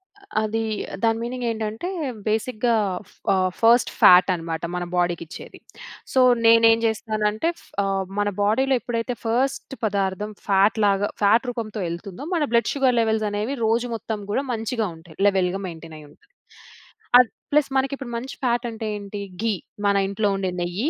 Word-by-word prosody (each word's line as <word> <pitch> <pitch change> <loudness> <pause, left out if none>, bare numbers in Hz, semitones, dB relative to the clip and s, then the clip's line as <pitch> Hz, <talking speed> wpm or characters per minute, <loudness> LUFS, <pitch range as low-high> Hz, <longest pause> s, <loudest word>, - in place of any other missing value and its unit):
అ 405 - -23 0.2
అది 215 +1 -1 0.4
దాని 225 0 +3
మీనింగ్ 245 +1 -4
ఏంటంటే, 220 +6 -3 0.4
బేసిక్‌గా 220 +2 0 0.4
ఫ్ - - -22 0.2
ఆహ్, 185 -1 +2
ఫస్ట్ 235 +1 +5
ఫాట్ 180 +1 +7
అన్నమాట 165 -1 -4
మన 180 - -2
బాడీకిచ్చేది. 175 -2 -3 0.6
సో, 260 - +3 0.3
నేనేం 230 0 +6
చేస్తానంటే 220 +3 0
ఫ్ - - -20 0.2
ఆహ్, 195 -1 -1
మన 205 0 +1
బాడీలో 250 +7 +2
ఎప్పుడైతే 235 +1 -3
ఫస్ట్ 260 +4 -1
పదార్థం 200 0 -1 0.2
ఫాట్‌లాగా 200 0 +3
ఫాట్ 225 +5 +4
రూపంతో 225 -3 -4
ఎళ్తుందో, 185 +9 -7
మన 325 - +1
బ్లడ్ 235 -2 +3
షుగర్ 265 -3 +2
లెవెల్స్ 220 -1 +1
అనేవి 210 +7 -2
రోజు 230 +2 +1
మొత్తం 220 -1 -5
కూడా 265 - 0
మంచిగా 225 0 -2
ఉంటాయి. 160 -1 -16
లెవెల్‌గా 190 -1 +1
మెయింటైనయ్యుంటది. 160 -3 -12 0.9
అద్ 250 -2 +4 0.2
ప్లస్ 295 -1 +3
మనకి 265 +1 0
ఇప్పుడు 255 -3 -7
మంచి 260 +4 -6
ఫాట్ 240 0 +1
అంటే 225 -1 -5
ఏంటి? 205 0 -7 0.2
ఘీ 225 -2 +2 0.3
మన 200 0 +3
ఇంట్లో 205 +1 0
ఉండే 190 -1 -2
నెయ్యి. 180 - -1
220 Hz, 150 wpm, -23 LUFS, 195-235 Hz, 0.9 s, ఫాట్